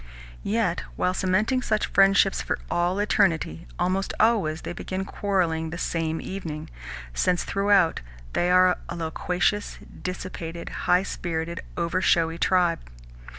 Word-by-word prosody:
Yet, - - 0 0.2
while 180 - +1
cementing 210 +8 +1
such 215 -3 0
friendships 195 0 +4
for - - -2
all 175 +2 +1
eternity, 165 - +1
almost 190 +2 0
always 200 -9 +2
they - - -4
begin 185 +2 -4
quarrelling 175 -6 0
the 170 - -6
same 165 -2 -1
evening, 160 - -6 0.4
since, 180 - +1
throughout, 195 -4 +2 0.3
they 175 - +1
are 180 0 +5
a - - -4
loquacious, 180 +4 -1 0.2
dissipated, 175 -2 -5 0.2
high 180 +1 +5
spirited, 170 -2 -3 0.2
over 175 +2 0
showy 165 -2 +2
tribe. 175 -3 +3
180 Hz, 125 wpm, -25 LUFS, 165-195 Hz, 0.4 s, are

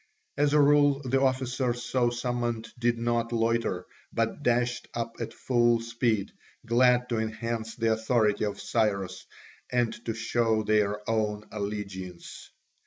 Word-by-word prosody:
As 145 0 +2
a 150 - +5
rule 145 -1 +5
the 135 +1 +1
officers 130 -2 0
so 125 -2 +1
summoned 120 -1 -2
did 120 0 +2
not 115 0 0
loiter, 115 -5 0 0.3
but - - -1
dashed 120 0 +1
up 115 0 -3
at - - -4
full 120 -2 +2
speed, 115 -3 -1 0.3
glad 125 +1 +4
to 115 -2 0
enhance 110 0 -3
the 115 -1 +1
authority 110 -2 +1
of 105 - -4
Cyrus 100 -5 -1 0.4
and 120 -2 +1
to 115 - -2
show 110 -1 +1
their 105 -1 +1
own 105 -1 0
allegiance. 100 -4 -6
115 Hz, 135 wpm, -28 LUFS, 110-120 Hz, 0.4 s, a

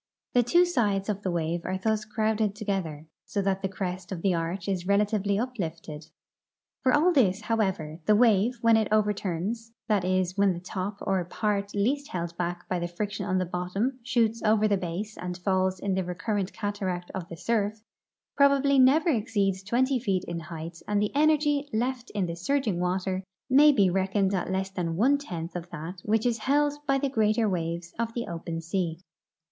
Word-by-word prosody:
The 245 - +5
two 345 +10 +4
sides 210 - 0
of 205 -1 -1
the 190 - -2
wave 170 0 -1
are 185 +1 -2
thus 215 +2 0
crowded 215 -1 0
together, 190 -8 -3 0.2
so 205 - -3
that 195 0 0
the 195 - -1
crest 185 -1 -5
of 175 -3 -5
the 195 -2 +3
arch 170 +3 -3
is 185 -3 -1
rela 200 +2 +4
tively 205 -1 0
uplifted. 165 -10 -5 0.7
For 260 - +3
all 320 +6 +4
this, 210 - +3
however, 190 -8 -1
the 210 - +6
wave 230 +1 +4
when 230 -1 +5
it 220 -1 +1
over 210 -1 +3
turns— 205 +5 -4
that 210 -4 +2
is, 185 0 0
when 200 -2 +3
the 170 - -6
top, 190 +2 -4
or 190 -2 0
part 200 +2 -2
least 270 +8 +1
held 170 -5 -4
back 175 0 -3
by 180 - -1
the 175 - -2
friction 200 +4 -4
on 185 - +1
the 185 - +1
bottom, 180 +9 -2
shoots 230 -2 +1
over 215 0 +3
the 205 - +3
base 190 +4 -4
and 180 0 -4
falls 185 0 0
in 195 0 -1
the 190 0 0
re 180 0 -5
current 200 +1 -2
cataract 190 -4 -3
of 180 -3 -5
the 170 - -8
surf 215 +1 -1 0.2
— - - -66
probably 280 -1 +4
never 290 +6 +5
exceeds 205 -6 0
twenty 250 +6 +1
feet 195 -6 0
in 170 0 -4
height 165 0 -7
and 205 -1 +1
the 210 0 0
energ}'^ 295 -1 +2
left 245 +2 -1
in 200 -3 +1
the 170 -1 -4
surging 215 0 0
water 185 +1 -1 0.3
may 295 +3 +8
be 205 -9 +4
reck 190 +2 -1
oned 195 -1 +2
at 185 -2 -1
less 190 +1 -1
than 170 -3 -2
one 270 +10 +3
tenth 175 - -6
of 175 0 -5
that 175 +4 -7
which 220 +1 +1
is 235 -2 +1
held 290 +5 +2
by 275 -1 +3
the 280 +1 0
greater 220 -3 +2
waves 170 -2 -3
of 230 -1 -2
the 235 - -2
o|)en 165 -1 -4
sea. 165 0 -2
200 Hz, 200 wpm, -27 LUFS, 180-230 Hz, 0.7 s, may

